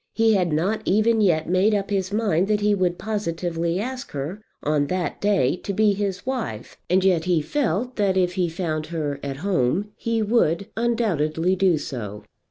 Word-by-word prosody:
He 225 -1 +4
had 180 -4 +1
not 190 +8 0
even 220 +3 +3
yet 165 -6 +2
made 190 +5 +3
up 200 0 -2
his 190 -1 -1
mind 200 -4 +1
that 210 0 +1
he 210 0 +3
would 180 -3 0
positively 170 -4 -2
ask 255 +4 -5
her 150 +9 -4 0.2
on 145 -1 +1
that 180 +1 -2
day 195 -10 +2
to 200 - -5
be 210 +1 +3
his 195 -1 -3
wife, 240 - -4
and 185 +2 +3
yet 175 -4 +3
he 180 -3 +2
felt 240 - -1
that 195 -3 +2
if 180 -1 +2
he 180 -2 0
found 160 -2 -3
her 150 -4 -3
at 135 -1 -4
home 190 +3 +1
he 230 -1 -1
would 200 -5 +2
undoubtedly 185 -8 +1
do 185 -3 +3
so. 105 -8 -6
185 Hz, 180 wpm, -23 LUFS, 165-210 Hz, 0.2 s, He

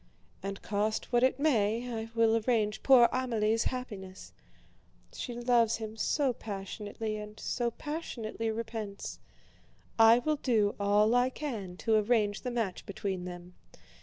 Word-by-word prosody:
And 195 +1 -5
cost 215 +4 -1
what 240 - +4
it 260 +1 +2
may, 235 -5 +2
I 225 0 -4
will 225 -1 +4
arrange 215 -2 +1
poor 255 -3 +7
Amélie's 225 -3 0
happiness, 205 -7 -6 0.8
she 245 - -5
loves 240 -2 +3
him 220 -1 -6
so 265 +3 +1
passionately, 210 +1 -5
and 210 0 -9
so 240 -1 -1
passionately 235 -5 -4
repents. 220 -2 -5 0.8
I 225 +1 +8
will 305 +5 0
do 220 -7 +2
all 205 +2 +3
I 245 +1 +4
can 220 -11 -5
to 225 - +3
arrange 210 -1 +1
the 250 - -3
match 225 -7 -2
between 195 -3 -3
them. 175 0 -8
225 Hz, 135 wpm, -30 LUFS, 205-240 Hz, 0.8 s, I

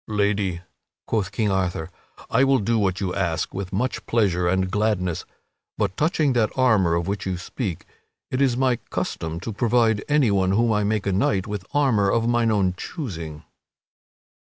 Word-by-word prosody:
"Lady," 100 -4 0 0.4
quoth 105 -3 -1
King 105 0 0
Arthur, 90 -3 -1 0.4
"I 125 +3 +3
will 135 0 +4
do 115 +1 +1
what 95 -2 0
you 95 -3 -2
ask 85 -4 -1
with 95 -1 -5
much 120 +7 -1
pleasure 95 -6 +2
and 95 +1 +1
gladness. 105 -5 0 0.5
But, 100 -3 -1
touching 155 -3 +1
that 115 -3 +2
armor 105 -10 +3
of 85 +1 -1
which 100 0 -3
you 95 -1 -1
speak, 90 - -5 0.5
it 130 - 0
is 130 -3 +2
my 130 -2 +2
custom 80 0 -3
to 115 - -5
provide 115 -1 +2
anyone 100 -11 +3
whom 115 +2 +3
I 105 0 +1
make 105 0 0
a 100 - +1
knight 95 0 +1
with 105 -3 -5
armor 125 -9 +2
of 115 +2 +1
mine 120 -1 +2
own 100 -4 +2
choosing." 85 - -6
105 Hz, 170 wpm, -23 LUFS, 95-115 Hz, 0.5 s, will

